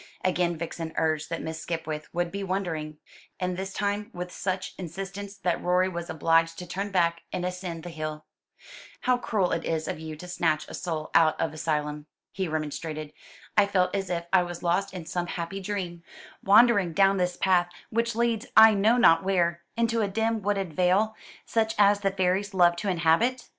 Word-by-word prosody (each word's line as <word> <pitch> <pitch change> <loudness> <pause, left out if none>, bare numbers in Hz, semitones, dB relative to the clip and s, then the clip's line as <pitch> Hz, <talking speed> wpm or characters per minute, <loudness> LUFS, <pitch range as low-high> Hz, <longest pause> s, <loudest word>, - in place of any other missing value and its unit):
Again 175 -2 +1
Vixen 165 0 -5
urged 160 -1 0
that 165 - -4
Miss 160 0 -5
Skipwith 160 -2 -4
would 175 0 -1
be 200 0 -4
wondering, 165 -6 -3 0.4
and 180 -1 -1
this 190 +1 -4
time 205 +2 -2
with 180 0 -5
such 185 0 -3
insistence, 195 +3 -6
that 180 -3 -1
Rorie 180 +1 +2
was 170 0 -5
obliged 165 +1 +2
to 180 - -6
turn 195 +4 -4
back 170 -3 +1
and 180 - -2
ascend 180 -2 -5
the 175 - -7
hill. 155 -1 -5 0.8
"How 250 -1 +2
cruel 200 -7 0
it 165 - -1
is 160 -1 -2
of - - -4
you 160 -1 -6
to 180 +4 -10
snatch 160 -3 0
a - - -10
soul 160 -4 -4
out 155 -1 +4
of 160 - 0
Elysium," 150 -1 -2 0.2
he 190 -1 -2
remonstrated. 155 0 -4 0.4
"I 205 -1 +5
felt 185 -2 +1
as 195 -1 -2
if 170 -1 -2
I 190 - +6
was 175 -1 -6
lost 175 +3 +1
in 180 -3 -7
some 175 +1 -3
happy 175 +3 -4
dream 185 -4 -4 0.4
wandering 200 -4 +5
down 195 +3 +4
this 180 -1 0
path, 180 -2 +3 0.2
which 230 0 0
leads 235 0 0
I 220 0 +10
know 215 +4 +3
not 165 -9 +6
where, 170 -3 +1 0.2
into 230 0 +1
a 205 - +1
dim 225 +2 0
wooded 195 -4 -1
vale, 190 +6 +2 0.3
such 220 -1 0
as 205 0 +5
the 200 -1 +1
fairies 190 +1 0
love 175 -2 +5
to 200 - -2
inhabit?" 180 +9 +2
180 Hz, 190 wpm, -27 LUFS, 165-200 Hz, 0.8 s, I